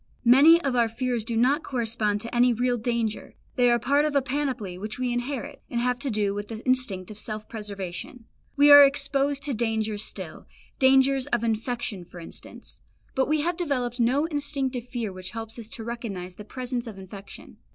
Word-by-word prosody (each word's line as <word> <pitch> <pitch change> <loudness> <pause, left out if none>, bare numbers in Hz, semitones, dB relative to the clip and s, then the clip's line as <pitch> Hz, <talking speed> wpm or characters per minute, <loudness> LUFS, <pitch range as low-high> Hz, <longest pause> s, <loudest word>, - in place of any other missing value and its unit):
Many 285 +8 +7
of 270 -2 0
our 235 -1 +3
fears 240 0 -2
do 230 0 -3
not 265 +7 +3
correspond 225 -6 -1
to 230 +2 -7
any 245 0 +4
real 245 +1 0
danger; 230 -2 -2 0.2
they 245 -1 +4
are 240 - +4
part 280 +5 +2
of 300 -1 -1
a 280 - +4
panoply 255 -8 -2
which 210 +4 -5
we 250 -1 -1
inherit, 245 +1 -4
and 235 - -2
have 250 0 0
to 275 -1 -3
do 205 -3 0
with 205 0 -5
the 225 0 -8
instinct 240 -8 0
of 210 - -8
self 215 -1 -4
preservation. 205 +1 -6 0.3
We 290 0 +6
are 285 0 +12
exposed 280 0 +2
to 280 -1 -1
dangers 220 -2 -1
still, - - -7 0.3
dangers 265 0 +4
of 240 -1 0
infection 225 -3 -2
for 175 0 -12
instance, 165 - -11 0.3
but 265 - +1
we 305 +1 +1
have 340 +2 -1
developed 255 -7 -2
no 255 +6 +2
instinctive 280 -5 -1
fear 235 -6 -4
which 185 +1 -7
helps 225 +1 -6
us 225 -1 -7
to 225 - -6
recognise 215 -6 -6
the 210 +3 -11
presence 250 0 -4
of 215 -3 -8
infection. 195 +1 -11
240 Hz, 195 wpm, -26 LUFS, 215-265 Hz, 0.3 s, are